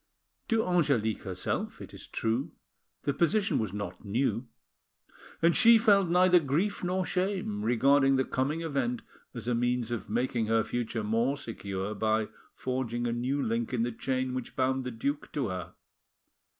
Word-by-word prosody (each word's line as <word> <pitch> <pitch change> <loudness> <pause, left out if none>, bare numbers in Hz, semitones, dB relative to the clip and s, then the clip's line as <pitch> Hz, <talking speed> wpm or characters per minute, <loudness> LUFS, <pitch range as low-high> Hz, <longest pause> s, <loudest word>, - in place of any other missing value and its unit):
To 225 -1 +2
Angelique 140 - +1
herself, 95 -1 -3
it - - -10
is - - -10
true, 125 +8 -2 0.5
the 140 - 0
position 195 +7 +2
was 110 -4 -2
not 100 0 -6
new, 120 +3 -1 1.0
and 170 +1 +5
she 235 -1 +8
felt 200 -5 +4
neither 180 +1 +5
grief 165 +9 -1
nor 185 +1 0
shame, 185 - -1
regarding 135 +4 +4
the 130 0 +2
coming 145 +5 -1
event 135 -7 -1 0.3
as - - -6
a 125 - +2
means 120 0 0
of 110 -5 -4
making 120 0 0
her 115 0 +3
future 115 -1 -3
more 115 +6 +1
secure 100 -4 -4
by 110 +1 0 0.3
forging 125 -2 -2
a 120 - 0
new 130 +4 -1
link 115 +2 -1
in 115 - +1
the 120 - -1
chain 130 +2 -2
which 130 -2 -5
bound 130 0 0
the - - -2
duke 140 +5 -3
to 135 -7 -1
her. 90 -2 -6
125 Hz, 165 wpm, -29 LUFS, 115-150 Hz, 1.0 s, she